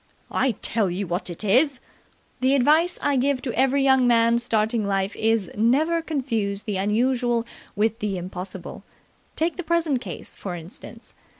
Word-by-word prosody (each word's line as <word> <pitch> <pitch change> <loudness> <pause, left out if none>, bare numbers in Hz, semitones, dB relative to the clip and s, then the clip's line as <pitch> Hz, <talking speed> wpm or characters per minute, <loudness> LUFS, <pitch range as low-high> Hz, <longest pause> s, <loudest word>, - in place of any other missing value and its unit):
"I 260 -2 +1
tell 215 -5 +1
you 185 +3 -3
what 175 +2 -3
it 175 +4 -6
is 255 +6 +3 0.3
" - - -37
"The 260 +2 +3
advice 310 +7 +3
I 285 -1 +2
give 270 +1 +1
to 245 - -3
every 270 +2 +2
young 265 -2 +4
man 235 0 +4
starting 225 -1 0
life 195 0 -1
is 225 -3 +1
'Never 295 +10 +2
confuse 230 -10 -2
the 205 -3 -2
unusual 235 +3 +1 0.3
with 220 +2 0
the 205 -4 -2
impossible!' 180 0 -7 0.5
Take 325 +1 -1
the 360 - -3
present 325 -5 +1
case, - - -8
for 185 -3 -5
instance. 170 +2 -9
235 Hz, 165 wpm, -24 LUFS, 200-270 Hz, 0.5 s, young